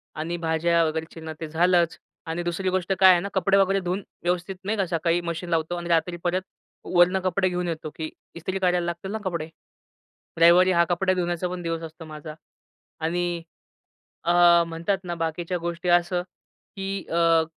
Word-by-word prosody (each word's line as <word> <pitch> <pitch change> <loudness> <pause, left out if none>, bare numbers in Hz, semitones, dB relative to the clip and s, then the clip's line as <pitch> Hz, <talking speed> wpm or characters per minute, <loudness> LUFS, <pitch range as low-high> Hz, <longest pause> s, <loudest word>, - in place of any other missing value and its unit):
आणि 160 +3 -3
भाज्या 165 0 +2
वगैरे 160 0 -2
चिरणं 160 -1 -7
ते 160 - -3
झालंच 170 +1 +2 0.3
आणि 165 +2 -2
दुसरी 175 +2 -1
गोष्ट 185 0 0
काय 190 -1 +9
आहे 180 - +5
ना 200 - -4
कपडे 195 +1 +3
वगैरे 195 0 +3
धुऊन 185 +2 -3 0.2
व्यवस्थित, 180 +2 -1
नाही 210 +3 -1
का, 195 - +1
सकाळी 170 0 +1
मशीन 170 0 -4
लावतो 165 +1 0
आणि 175 0 -5
रात्री 170 +1 +1
परत 180 +1 +1 0.5
वरनं 180 +2 +5
कपडे 185 +1 +1
घेऊन 180 0 -2
येतो, 160 -2 -4
की 160 -1 -4 0.3
ईस्त्री 185 +3 -3
करायला 180 -2 +2
लागतील 175 +3 -4
ना 220 - -2
कपडे. 170 -4 -3 0.9
रविवारी 175 +3 +7
हां 170 -1 +4
कपडा 185 +2 +2
धुण्याचा 175 -1 -1
पण 180 0 -5
दिवस 165 -1 -3
असतो 160 0 -9
माझा. 155 0 -8 0.7
आणि 170 +1 -1 0.8
अ, 175 0 +6
म्हणतात 165 +4 -1
ना 175 -1 -4
बाकीच्या 165 +2 -2
गोष्टी 170 +1 -3
असं 175 +1 +3 0.6
की 195 0 -3
अ, 165 -1 +4
175 Hz, 175 wpm, -25 LUFS, 165-180 Hz, 0.9 s, काय